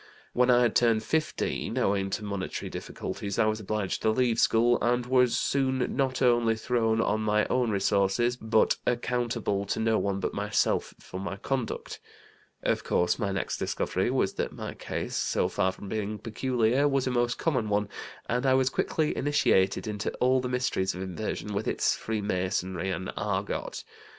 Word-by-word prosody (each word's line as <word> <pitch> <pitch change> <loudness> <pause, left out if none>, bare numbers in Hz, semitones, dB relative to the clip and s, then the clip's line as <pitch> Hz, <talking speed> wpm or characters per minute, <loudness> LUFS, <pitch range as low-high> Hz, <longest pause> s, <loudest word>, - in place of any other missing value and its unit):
When 125 0 +3
I 125 0 +6
had 120 - +1
turned 115 -2 +3
15, 160 +4 -1
owing 95 0 +1
to 105 - -3
monetary 100 -2 -4
difficulties 100 -1 -5
I 115 - +4
was 110 0 0
obliged 105 -2 -2
to 110 - +2
leave 120 0 +2
school, 120 +2 +4
and 120 +1 +1
was 125 -1 +3
soon 130 -2 0
not 130 -1 0
only 120 -2 +4
thrown 115 -1 +1
on 110 -1 +1
my 105 0 +2
own 125 -2 +2
resources, 100 +4 +2
but 110 -2 +2
accountable 120 -4 0
to 100 - -2
no 110 0 +2
one 100 -1 -1
but - - -2
myself 105 +1 0
for 95 - -8
my 95 0 -4
conduct. 130 +2 -3 0.6
Of - - 0
course, 90 +6 +1
my 100 -4 -1
next 95 - -2
discovery - - -1
was - - +1
that - - -3
my - - -6
case, - - -5
so - - +1
far 95 - +1
from 95 +2 -10
being 105 +1 -3
peculiar, 125 +4 +1
was 135 -2 +1
a 130 - 0
most 120 0 +1
common 130 -10 0
one, 105 0 +1 0.4
and 125 +1 -1
I 130 - +5
was 130 0 +2
quickly 155 +2 0
initiated 100 -10 +2
into 105 -1 -2
all 130 +1 +3
the 125 - -3
mysteries 120 -7 0
of 90 - -4
inversion, 105 +2 -4
with 100 +2 -2
its - - +1
freemasonry 95 -3 -2
and 95 -1 -3
'argot.' - - -3
110 Hz, 175 wpm, -28 LUFS, 100-125 Hz, 0.6 s, I